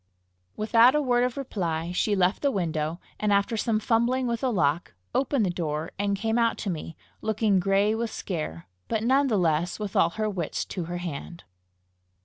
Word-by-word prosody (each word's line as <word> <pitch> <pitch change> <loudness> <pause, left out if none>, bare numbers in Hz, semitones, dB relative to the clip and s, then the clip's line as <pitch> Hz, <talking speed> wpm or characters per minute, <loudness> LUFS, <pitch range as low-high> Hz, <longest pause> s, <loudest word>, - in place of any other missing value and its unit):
Without 230 +4 +5
a - - +4
word 245 -2 +2
of 250 0 -1
reply, 170 -10 -2
she 205 +3 +1
left 185 0 +2
the 285 - +3
window, 165 - -2 0.2
and 210 -1 +1
after 200 +3 +2
some 220 0 +1
fumbling 240 +3 +1
with 235 -1 -1
the 260 - +1
lock, 145 - 0 0.2
opened 270 -4 +1
the 180 - 0
door, 160 -2 -3
and 200 0 0
came 225 +3 0
out 230 -1 +2
to 200 - -2
me, 165 -1 -6 0.2
looking 215 -2 +2
gray 195 +3 +2
with 230 +1 -2
scare, 155 - -5 0.2
but 220 -1 -1
none 270 +4 +3
the 220 -5 +1
less 170 -1 +1
with 210 -2 -5
all 165 - +4
her 215 +5 -2
wits 185 -7 -3
to 180 -4 -5
her 175 +1 -4
hand. 170 0 -6
200 Hz, 190 wpm, -26 LUFS, 170-230 Hz, 0.2 s, Without